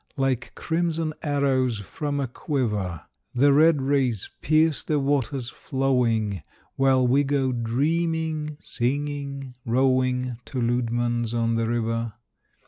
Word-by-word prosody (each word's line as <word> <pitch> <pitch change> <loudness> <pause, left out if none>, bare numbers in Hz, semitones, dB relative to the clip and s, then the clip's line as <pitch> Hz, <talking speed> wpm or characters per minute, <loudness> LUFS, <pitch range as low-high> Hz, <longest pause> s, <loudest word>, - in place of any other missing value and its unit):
Like 135 -3 -1
crimson 165 -1 -1
arrows 135 -5 +1
from 145 - -4
a 135 - -1
quiver 105 - -2 0.3
The 140 +3 +5
red 150 -1 +5
rays 130 -7 0
pierce 155 0 +3
the 150 -1 0
waters 135 -3 -1
flowing 120 -7 0 0.3
While 135 -1 +3
we 135 +4 +4
go 135 -2 +1
dreaming, 155 +5 -1
singing, 140 +1 -3
rowing 130 0 +1
To 130 - -4
Leudemann's 120 -1 0
on 115 0 +1
the 115 0 0
River. 115 -1 -1
130 Hz, 115 wpm, -25 LUFS, 120-145 Hz, 0.3 s, The